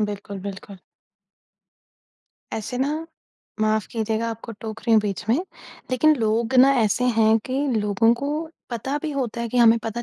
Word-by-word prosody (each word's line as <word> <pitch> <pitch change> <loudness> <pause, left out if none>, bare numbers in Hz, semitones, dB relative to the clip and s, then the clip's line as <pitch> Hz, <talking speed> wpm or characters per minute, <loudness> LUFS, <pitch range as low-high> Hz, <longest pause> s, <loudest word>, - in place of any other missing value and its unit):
बिल्कुल, 205 -1 -4
बिल्कुल। 200 0 -8 1.7
ऐसे 220 +3 -4
ना, 305 +4 -1 0.5
माफ़ 215 0 +1
कीजिएगा 225 0 -1
आपको 230 +1 -7
टोक 220 0 -6
रही 230 - 0
हूँ 220 - +6
बीच 205 0 -4
में, 240 - +3 0.5
लेकिन 305 +5 +4
लोग 225 +2 0
ना 270 +2 +7
ऐसे 220 +3 +1
हैं 220 0 +5
कि 270 +3 -1
लोगों 210 +2 +3
को 280 +4 -4 0.4
पता 265 +5 -3
भी 310 - -2
होता 250 -5 -3
है 235 - -2
कि 250 - -4
हमें 230 -1 +6
पता 230 +2 -3
230 Hz, 160 wpm, -23 LUFS, 215-255 Hz, 1.7 s, ना